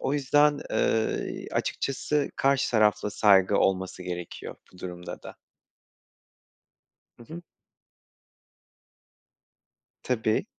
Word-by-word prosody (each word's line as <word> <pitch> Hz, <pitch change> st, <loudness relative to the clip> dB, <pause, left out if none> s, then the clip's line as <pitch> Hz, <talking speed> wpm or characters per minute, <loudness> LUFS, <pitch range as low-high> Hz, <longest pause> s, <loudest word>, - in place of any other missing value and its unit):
O 135 Hz, -, -1 dB
yüzden, 145 Hz, +1 st, +3 dB
eee, 110 Hz, 0 st, -1 dB
açıkçası 145 Hz, +2 st, -1 dB
karşı 135 Hz, 0 st, +2 dB
tarafla 105 Hz, -1 st, +2 dB
saygı 95 Hz, -3 st, +4 dB
olması 95 Hz, -1 st, 0 dB
gerekiyor 90 Hz, -1 st, -7 dB, 0.2 s
bu 90 Hz, -, -17 dB
durumda 90 Hz, -1 st, -8 dB
da. -, -, -11 dB, 1.8 s
Hı 120 Hz, -, -13 dB
hı. 170 Hz, -, -7 dB, 2.6 s
Tabii. 110 Hz, -, 0 dB
110 Hz, 85 wpm, -27 LUFS, 95-135 Hz, 2.6 s, saygı